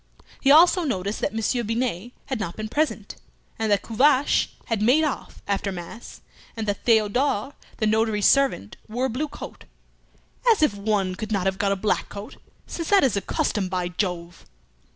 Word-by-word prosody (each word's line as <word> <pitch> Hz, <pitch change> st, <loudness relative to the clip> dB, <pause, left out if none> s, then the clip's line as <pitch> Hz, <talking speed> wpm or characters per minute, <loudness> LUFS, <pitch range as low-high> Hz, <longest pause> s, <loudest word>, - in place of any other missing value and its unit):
He 270 Hz, -, +1 dB
also 340 Hz, +4 st, +6 dB
noticed 200 Hz, -, -2 dB
that -, -, 0 dB
Monsieur 225 Hz, +3 st, 0 dB
Binet 230 Hz, -1 st, -2 dB
had 265 Hz, -4 st, -3 dB
not 170 Hz, -4 st, -4 dB
been 215 Hz, 0 st, -5 dB
present, 310 Hz, +6 st, -2 dB, 0.4 s
and 220 Hz, -1 st, 0 dB
that 205 Hz, -, +2 dB
Tuvache 270 Hz, +4 st, +3 dB, 0.2 s
had 225 Hz, -3 st, -2 dB
"made 255 Hz, +9 st, +4 dB
off" 300 Hz, -4 st, -4 dB
after 200 Hz, 0 st, -1 dB
mass, 185 Hz, +6 st, -9 dB, 0.4 s
and 220 Hz, -, -2 dB
that 205 Hz, -, -2 dB
Theodore, 225 Hz, +3 st, +2 dB, 0.2 s
the 215 Hz, -, 0 dB
notary's 220 Hz, -1 st, +1 dB
servant 275 Hz, -, +2 dB
wore 245 Hz, +4 st, -1 dB
a -, -, 0 dB
blue 280 Hz, +7 st, -2 dB
coat, -, -, -10 dB, 0.9 s
"as 415 Hz, -8 st, +3 dB
if 300 Hz, -, +3 dB
one 200 Hz, -2 st, -1 dB
could 215 Hz, +4 st, -6 dB
not 195 Hz, -3 st, 0 dB
have 190 Hz, -1 st, 0 dB
got 200 Hz, 0 st, +1 dB
a -, -, +2 dB
black 200 Hz, +2 st, -1 dB
coat, 200 Hz, +1 st, -9 dB, 0.3 s
since 335 Hz, -2 st, -5 dB
that 400 Hz, -4 st, +5 dB
is 260 Hz, -6 st, +3 dB
the 200 Hz, -, 0 dB
custom, 195 Hz, -1 st, -1 dB
by 180 Hz, -1 st, -2 dB
Jove!" 175 Hz, -2 st, -4 dB
215 Hz, 180 wpm, -24 LUFS, 200-260 Hz, 0.9 s, also